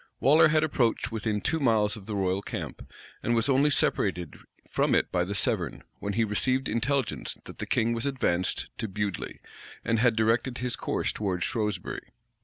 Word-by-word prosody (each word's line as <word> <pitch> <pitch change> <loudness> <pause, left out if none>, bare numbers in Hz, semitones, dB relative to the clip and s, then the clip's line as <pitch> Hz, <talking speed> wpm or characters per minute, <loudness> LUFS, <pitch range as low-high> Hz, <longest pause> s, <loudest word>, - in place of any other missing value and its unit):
Waller 145 +7 +6
had 155 0 +3
approached 125 -5 +1
within 105 -1 -1
two 160 - 0
miles 110 -6 +2
of 105 -3 -11
the 105 - -3
royal 95 0 0
camp, - - -7 0.3
and 120 - +1
was 115 - +2
only 140 +2 +4
separated 90 - 0 0.3
from - - +2
it - - +1
by 90 - +2
the 100 +3 -3
Severn, - - 0 0.2
when 100 - -3
he 115 +3 +2
received 130 +5 +1
intelligence 130 +3 -1
that - - -11
the - - -4
king 115 0 +2
was 115 +4 -1
advanced 90 -10 0
to 110 - -1
Bewdly, 100 -1 -4 0.4
and 115 -1 +2
had 120 -1 +4
directed 115 +3 +1
his 125 -2 -1
course - - -1
towards 95 -4 -2
Shrewsbury. 105 -5 -2
115 Hz, 180 wpm, -28 LUFS, 100-125 Hz, 0.4 s, Waller